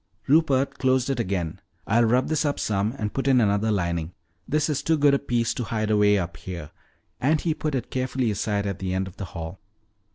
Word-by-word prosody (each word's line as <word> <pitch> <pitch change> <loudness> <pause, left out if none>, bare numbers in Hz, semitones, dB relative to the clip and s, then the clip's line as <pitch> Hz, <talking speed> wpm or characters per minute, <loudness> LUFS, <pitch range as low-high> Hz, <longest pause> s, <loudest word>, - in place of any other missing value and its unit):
Rupert 140 -2 +2
closed 130 0 +2
it 130 - -2
again. 90 -7 -2 0.2
"I'll 115 +2 +3
rub 125 +3 +2
this 155 0 +1
up 145 -2 -1
some 105 +3 0
and 105 -3 -3
put 135 0 -2
in 130 -2 +5
another 105 0 +2
lining. 85 -4 -1 0.3
This 150 0 +1
is 145 -2 -1
too 160 +2 +2
good 145 -1 +4
a 140 - +3
piece 120 -4 0
to 120 - -3
hide 110 -1 -1
away 105 -1 +4
up 85 -4 -3
here," 85 -3 -7 0.5
and 150 +4 +2
he 165 0 0
put 155 -2 -2
it 125 -3 -4
carefully 130 -2 0
aside 100 0 -1
at 100 -1 -3
the 95 -1 -2
end 95 0 -1
of 95 +1 -12
the 100 - -4
hall. 85 +1 -7
115 Hz, 220 wpm, -25 LUFS, 95-135 Hz, 0.5 s, in